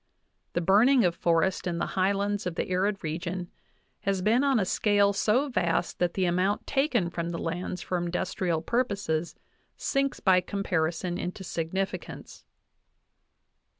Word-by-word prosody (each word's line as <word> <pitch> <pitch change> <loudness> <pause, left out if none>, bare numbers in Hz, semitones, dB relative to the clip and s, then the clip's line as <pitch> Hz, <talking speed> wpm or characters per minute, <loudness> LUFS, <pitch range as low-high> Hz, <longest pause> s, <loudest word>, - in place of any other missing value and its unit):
| - - -48
The 175 - +1
burning 220 +7 +5
of 175 - +2
forests 170 +2 +1
in 170 -1 -1
the 170 - 0
high 190 +1 +2
lands 200 0 -1
of 175 - -4
the - - -2
arid 195 +2 0
region 175 +3 -4 0.5
has 195 -2 -1
been 230 +6 +3
on 275 -4 +3
a 195 - +1
"scale 200 +1 +3
so 230 +8 +2
vast 175 - -1
that 175 -1 0
the 190 - +1
amount 180 +3 +1
taken 250 - +1
from 170 -1 -3
the 170 - -3
lands 180 +2 -4
for 180 - -1
industrial 175 -1 -1
purposes 200 -8 -1 0.4
sinks 275 -1 0
by 185 -2 +4
comparison 175 -2 -1
into 180 +2 -5
insignificance" 180 +3 -4
(15). - - -51
185 Hz, 155 wpm, -28 LUFS, 175-205 Hz, 0.5 s, burning